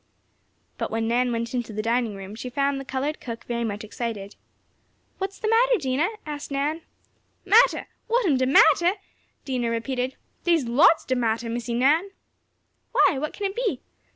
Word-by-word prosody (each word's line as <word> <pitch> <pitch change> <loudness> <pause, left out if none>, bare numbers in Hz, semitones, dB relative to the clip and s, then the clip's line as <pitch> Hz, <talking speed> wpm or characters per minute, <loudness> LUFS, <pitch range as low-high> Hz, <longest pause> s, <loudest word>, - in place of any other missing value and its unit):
But - - -2
when 225 0 -1
Nan 245 +1 +1
went 230 0 -1
to 250 0 -1
the 215 - -2
dining 230 -2 0
room, 195 +1 -8
she 230 +3 -6
found 275 +2 0
the - - -6
colored 275 +4 -3
cook 230 -2 -7
very 235 -1 -3
much 210 -2 -3
excited. 215 -2 -5 0.8
"What 385 +1 -1
is 395 - -17
the 435 - -3
matter, 480 +2 +4
Dinah?" 280 +2 0 0.2
asked 295 -1 -6
Nan. 290 +4 -1 0.6
"Mattah! 440 +6 +5 0.2
What 480 0 +2
am 305 -7 +3
de 260 0 +1
mattah?" 325 +6 +5 0.5
Dinah 250 -3 -1
repeated, 250 +2 -2 0.3
"Dey's 335 -6 +2
lots 265 +7 +4
de 260 - 0
mattah, 230 -1 0
Missie 235 0 -3
Nan." 300 +10 +3 0.8
"Why, 270 - +4
what 305 +2 -3
can 410 - -5
it 390 0 -2
be?" 440 - -2
260 Hz, 175 wpm, -25 LUFS, 235-320 Hz, 0.8 s, Mattah